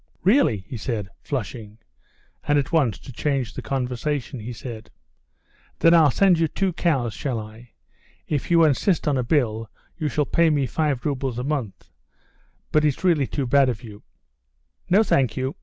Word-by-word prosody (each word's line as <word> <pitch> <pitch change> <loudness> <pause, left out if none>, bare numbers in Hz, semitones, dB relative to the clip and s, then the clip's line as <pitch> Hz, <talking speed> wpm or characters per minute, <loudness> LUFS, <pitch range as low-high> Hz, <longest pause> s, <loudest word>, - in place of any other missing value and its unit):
"Really," 180 - +3
he 125 - -6
said, 105 -3 -3
flushing, 110 -4 -5 0.7
and 145 0 +3
at 140 - -1
once, 140 - +2
to 130 - -12
change 135 -2 -1
the - - -6
conversation, 130 +3 -3
he 115 +3 -6
said: 115 -2 -8 0.9
"Then 165 - +5
I'll 160 -3 +6
send 180 +4 +3
you 165 - +3
two 185 +4 -1
cows, 140 - 0
shall 125 +2 -3
I? 110 +2 -11 0.5
If 145 -4 -2
you 170 -1 +5
insist 155 +4 +1
on 145 - +2
a - - 0
bill 115 -5 0 0.3
you 155 - -1
shall 150 +2 0
pay 170 +2 +3
me 145 -3 +1
five 145 -2 -1
roubles 135 -4 -2
a 125 - -2
month; 135 -8 -4 0.8
but 155 - +3
it's 150 +1 0
really 160 -7 +3
too 140 - -2
bad 135 +1 +4
of 120 0 -4
you." 105 -3 -11 0.9
"No, 200 +5 +5
thank 135 - +1
you. 130 +2 -2
135 Hz, 175 wpm, -23 LUFS, 120-155 Hz, 0.9 s, I'll